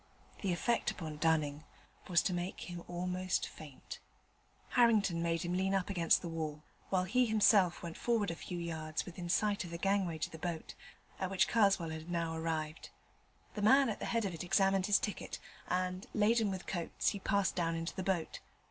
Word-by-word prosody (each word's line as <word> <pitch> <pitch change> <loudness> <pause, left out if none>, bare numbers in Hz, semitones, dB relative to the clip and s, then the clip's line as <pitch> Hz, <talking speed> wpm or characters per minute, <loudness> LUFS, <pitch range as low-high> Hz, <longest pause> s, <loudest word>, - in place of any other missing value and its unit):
The 195 - 0
effect 235 +7 +1
upon 155 -4 -5
Dunning 155 -2 +1 0.4
was 175 -3 +3
to 185 - 0
make 175 +2 -3
him 175 -1 -6
almost 180 +1 -1
faint. 145 -4 -10 0.7
Harrington 215 -8 +3
made 165 -1 0
him 175 0 -2
lean 190 +2 +1
up 195 +1 0
against 170 -2 +3
the - - -3
wall, 155 -2 -4 0.3
while 185 -1 +2
he 250 +7 +2
himself 205 -5 +4
went 170 -1 -5
forward 225 -6 +1
a - - -4
few 175 +1 -6
yards 160 -2 -3
within 175 0 -7
sight 205 +2 +2
of 175 - -7
the 170 - -5
gangway 195 -3 +1
to 155 - -2
the 160 - -9
boat, 170 -1 -4 0.5
at 190 - -1
which 190 -1 +3
Karswell 195 -7 +3
had 160 +1 -7
now 170 -2 -1
arrived. 160 -1 -3 0.6
The 210 - -4
man 265 +5 +6
at 215 - -3
the - - -4
head 230 -2 0
of 190 - -2
it 165 - -5
examined 195 +1 +3
his 205 -2 +5
ticket, 210 - -4 0.3
and, 185 +1 -1
laden 220 0 +3
with 190 -2 -4
coats, 175 -3 -1
he 200 - -4
passed 200 0 +1
down 165 -2 0
into 165 +1 -3
the - - -3
boat. 185 -3 -1
180 Hz, 190 wpm, -34 LUFS, 165-195 Hz, 0.7 s, man